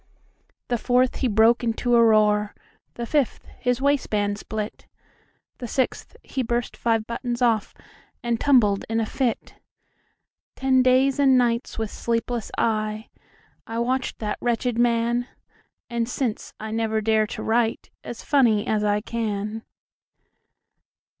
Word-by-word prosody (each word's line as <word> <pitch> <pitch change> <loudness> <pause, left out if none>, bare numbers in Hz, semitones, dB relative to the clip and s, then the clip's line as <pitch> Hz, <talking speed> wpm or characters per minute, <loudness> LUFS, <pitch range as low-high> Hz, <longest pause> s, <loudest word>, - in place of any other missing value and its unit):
The 240 -1 0
fourth; 250 +2 +2
he 260 - 0
broke 225 +2 +4
into 240 +1 +1
a 235 - +6
roar; 210 -2 +3 0.4
The 235 - -4
fifth; 285 0 0
his 250 +1 0
waistband 210 -8 +1
split; 215 0 -6 0.7
The 245 - -5
sixth; 260 +3 -2
he 265 - -3
burst 240 0 -2
five 225 -2 0
buttons 240 +1 -4
off, 230 -4 +1 0.5
And 235 -1 0
tumbled 225 -8 +3
in 225 0 0
a 225 - 0
fit. 245 +1 -2 1.0
Ten 265 -1 +3
days 260 +2 +3
and 270 -2 +5
nights, 235 -1 0
with 220 -2 -3
sleepless 235 -1 -2
eye,I 215 +1 -4
watched 255 +2 -1
that 210 -2 -3
wretched 240 0 0
man, 240 0 +1 0.6
And 235 -1 -2
since, 245 -4 -3
I 220 0 -6
never 220 -1 0
dare 215 0 +2
to - - -6
writeAs 230 +1 -2
funny 235 -8 +3
as 215 -1 0
I 210 0 +1
can. 215 -1 -3
230 Hz, 130 wpm, -24 LUFS, 220-245 Hz, 1.0 s, a